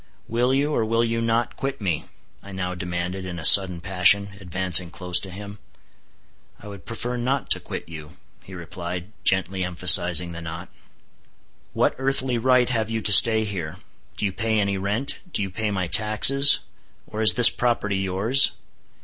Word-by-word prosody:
"Will 120 +3 -2
you, 140 +3 -2
or 115 - -2
will 115 +1 -2
you 115 0 -4
not, 115 +1 -3
quit 135 0 -7
me?" 90 -7 -5 0.4
I 100 - -15
now 90 -1 -6
demanded 90 +1 -7
in 90 -2 -9
a 80 - -8
sudden 90 -2 +6
passion, 95 +2 0
advancing 90 -1 +2
close 90 0 0
to 95 - -10
him. 100 +2 -12 1.0
"I - - -15
would 100 -4 -14
prefer 120 +2 -7
not 130 +2 -5
to - - +6
quit - - -10
you," 80 -2 -13 0.2
he 95 - -15
replied, 90 +2 -9
gently 95 0 0
emphasizing 90 -1 +4
the 85 0 -10
not. 85 +2 -10 1.0
"What - - -1
earthly 130 -2 -1
right 125 0 0
have 110 -2 -4
you 115 0 -4
to 105 - +1
stay 110 +1 +6
here? 95 -7 -8 0.4
Do - - -3
you 100 - -4
pay 110 +2 -3
any 100 -1 -3
rent? 100 +8 -5
Do 100 - -2
you 95 - -8
pay 110 +3 -5
my 95 -3 -4
taxes? 110 +9 +5 0.4
Or 110 - -8
is 110 - +6
this 125 -2 +7
property 115 -5 -3
yours?" 95 +8 +1
100 Hz, 175 wpm, -20 LUFS, 90-115 Hz, 1.0 s, this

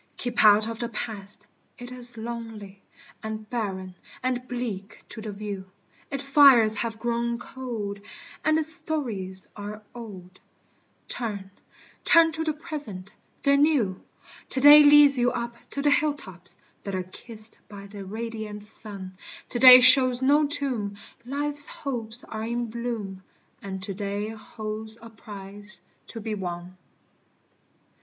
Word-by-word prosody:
Keep 245 -1 +1
out 210 +1 +6
of 230 0 -5
the 235 - -3
Past. 210 -2 -5 0.3
It 245 0 -9
is 245 -1 -4
lonely, 220 -4 -7 0.4
And 220 0 -6
barren 190 -6 -3 0.3
and 255 0 -1
bleak 225 -5 -5
to 220 - -5
the 215 -1 -5
view; 200 -2 -6 0.4
Its 275 0 -4
fires 275 -6 +6
have 225 0 -2
grown 235 +1 -1
cold, 235 -5 -6 0.4
and 310 0 +3
its 315 0 +1
stories 235 - -3
are 210 +1 -7
old 190 -6 -10 0.7
Turn, 200 -5 -5 0.5
turn 330 -1 +6
to 320 0 -3
the 315 -1 0
Present 235 - -7 0.3
the 280 0 +4
New: 280 -10 +2 0.5
To - - -1
day 290 +2 +10
leads 290 -2 +7
you 245 0 +3
up 235 -1 -3 0.2
to 280 - -4
the 290 - +4
hilltops 275 - -2 0.3
That 200 -1 -4
are 185 - -2
kissed 215 +4 -10
by 200 -1 -10
the 200 0 -9
radiant 215 0 -6
sun, 200 -3 -8 0.3
To 240 - -2
day 255 0 +11
shows 255 -1 +7
no 290 +2 +4
tomb, 245 -9 0 0.3
life's 290 +2 -1
hopes 240 -4 -5
are 220 - -6
in 235 0 -3
bloom, 225 -5 -4 0.4
And 190 -1 -6
to 200 0 -3
day 205 +1 -3
holds 220 0 -7
a 230 0 -12
prize 205 -1 -11 0.3
to 230 - -8
be 220 0 -4
won. 180 -2 -5
225 Hz, 140 wpm, -26 LUFS, 205-255 Hz, 0.7 s, day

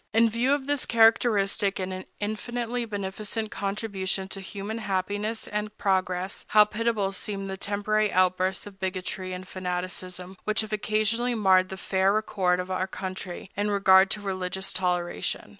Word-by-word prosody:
In 230 0 +5
view 240 +4 +1
of 285 -2 -1
this 290 -1 +1
characteristic 225 -3 +3
and 185 -1 -4
infinitely 235 +3 -2
beneficent 210 +1 -4
contribution 195 -2 -2
to 195 - -6
human 205 +3 -5
happiness 205 +2 -2
and 210 0 -3
progress, 185 -1 0
how 210 0 +7
pitiable 215 -2 0
seem 195 +1 -4
the 190 0 -4
temporary 205 +2 0
outbursts 185 +1 +2
of 200 -2 -11
bigotry 185 0 -3
and 185 0 -6
fanaticism 185 0 -4
which 215 +1 +2
have 215 0 -6
occasionally 215 +3 +1
marred 190 -3 +4
the 190 - -6
fair 190 +1 +2
record 190 -4 +1
of 180 +1 -4
our 185 0 0
country 185 -1 -6
in 205 +1 0
regard 195 -1 +6
to 210 - -2
religious 190 -1 -3
toleration! 180 - -1
195 Hz, 150 wpm, -27 LUFS, 185-215 Hz, -, how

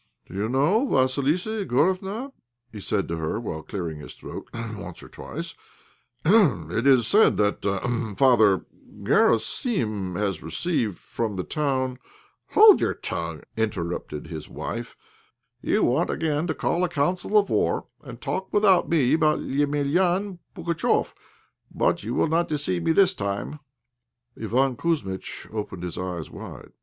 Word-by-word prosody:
"Do - - -14
you 100 +3 -1
know, 160 - +2
Vassilissa 150 - +1
Igorofna," 190 - 0 0.5
said 100 0 -1
he - - -10
to 85 - -2
her, 80 +6 -2
while 85 -9 -5
clearing 85 -4 -5
his 75 - -10
throat - - -9
once 110 -6 -7
or - - -12
twice, - - -7 0.7
"it 135 - +3
is 130 -4 +5
said 210 - +4
that 105 -1 +1 0.6
Father 110 -8 +4 0.4
Garosim 110 - +1
has 95 -4 -1
received 105 - -2
from 110 -3 -4
the 90 - -2
town 130 - -1 0.2
" - - -36
"Hold 425 -1 +8
your - - +1
tongue," - - -5
interrupted 90 -8 -3
his 80 -3 -8
wife; - - -6 0.6
"you - - +1
want 140 +8 +2
again 155 0 -1
to 160 - -1
call 175 - 0
a 180 - +1
council 180 +7 +1
of 205 - +3
war, - - +1 0.2
and - - -10
talk 190 +1 -3
without 200 -3 +4
me 145 -7 +3
about 155 -1 +3
Emelian 170 +7 0 0.2
Pugatchéf; 170 -1 0 0.6
but - - +1
you 115 +4 -3
will - - +2
not 165 +2 +1
deceive 145 - 0
me 165 - +2
this 190 +2 +4
time." 100 - -4 0.8
Iván 125 +4 0
Kouzmitch 140 - -3
opened 105 -4 -5
his 90 0 -5
eyes 90 -3 -4
wide. - - -10
130 Hz, 145 wpm, -25 LUFS, -, 0.8 s, Hold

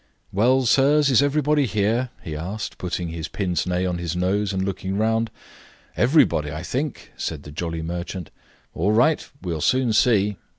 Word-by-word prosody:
"Well, 125 +6 +3
sirs, 140 +3 +4
is 130 - +5
everybody 145 0 +2
here?" 110 +4 0
he 80 - -5
asked, 95 +7 -5
putting 90 -1 -3
his 80 -1 -5
pince 90 -4 -2
nez 90 0 0
on 90 -1 -2
his 85 -1 -3
nose, 95 +3 0
and 95 -1 -1
looking 95 0 -3
round. 110 +1 +1 0.7
"Everybody, 85 - +3
I 80 +2 -5
think," 135 - -4
said 75 -3 -4
the 75 - -10
jolly 80 +1 -4
merchant. 85 +1 -5 0.4
"All 100 +6 +1
right; 135 +8 +2
we'll 85 -4 -3
soon 130 - +2
see." 105 -3 +3
100 Hz, 165 wpm, -23 LUFS, 85-125 Hz, 0.7 s, is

